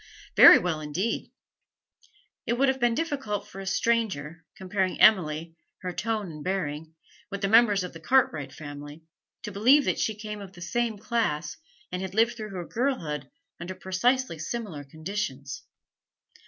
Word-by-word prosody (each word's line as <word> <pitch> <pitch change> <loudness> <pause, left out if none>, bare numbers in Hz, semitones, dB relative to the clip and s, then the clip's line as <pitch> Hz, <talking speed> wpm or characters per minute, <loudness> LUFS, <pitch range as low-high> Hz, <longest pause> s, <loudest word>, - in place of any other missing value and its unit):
'Very - - +10
well 175 -3 -1
indeed.' 160 +9 -2 1.2
It - - +2
would 265 +3 +3
have 265 0 0
been 240 -1 +2
difficult 265 -10 -2
for 195 - -10
a 195 - -8
stranger, 190 -8 0
comparing 190 0 -1
Emily, 165 -5 +4 0.3
her 180 -1 -3
tone 220 0 -2
and 150 -1 -9
bearing, 160 -4 -3 0.3
with 200 0 -5
the 195 - +1
members 210 -2 +5
of 180 - -6
the 165 - -9
Cartwright 160 - +2
family, 145 +1 -9 0.4
to 210 - -5
believe 255 +9 +5
that - - 0
she 220 - 0
came 210 0 -7
of 195 -2 -10
the 175 - -14
same 230 +4 -1
class 210 - -1 0.4
and 180 0 -3
had 190 0 -5
lived 230 +2 +3
through 215 -2 -6
her 180 -3 -6
girlhood 175 - -2 0.3
under 180 +2 -6
precisely 215 - 0
similar 175 -4 -5
conditions. 150 - -5
195 Hz, 155 wpm, -27 LUFS, 160-225 Hz, 1.2 s, Very